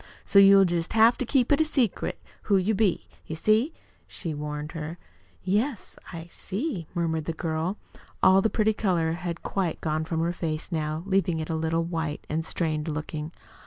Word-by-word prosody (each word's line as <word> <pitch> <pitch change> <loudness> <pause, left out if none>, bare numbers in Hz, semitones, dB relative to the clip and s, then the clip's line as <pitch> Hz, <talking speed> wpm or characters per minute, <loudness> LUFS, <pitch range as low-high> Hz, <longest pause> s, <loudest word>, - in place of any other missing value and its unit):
"So 200 - +5
you'll 195 0 +8
jest 170 -1 -1
have 225 +2 +6
to 255 - -2
keep 255 -1 +2
it 290 +2 +5
secret 265 -9 0 0.3
who 200 - +5
you 190 +4 +1
be, 200 -3 +1 0.2
you 160 - -4
see," 215 - +2 0.4
she 165 -4 -5
warned 150 +1 -5
her. 165 +1 -6 0.5
"Yes, 210 +5 -1
I 165 -2 -7
see," 195 - -4
murmured 160 -2 -1
the 165 - -2
girl. 160 +4 -2 0.5
All 190 +1 +7
the 220 - +2
pretty 220 0 +2
color 175 -6 +1
had 170 0 -4
quite 185 -5 -1
gone 155 0 -1
from 160 0 -1
her 170 +1 0
face 160 -1 -3
now, 155 0 -2
leaving 190 -4 +1
it 155 +1 -3
a - - 0
little 160 +1 0
white 165 -3 -3
and 160 +1 0
strained 160 -1 -2
looking. 150 0 -4
170 Hz, 180 wpm, -26 LUFS, 160-200 Hz, 0.5 s, you'll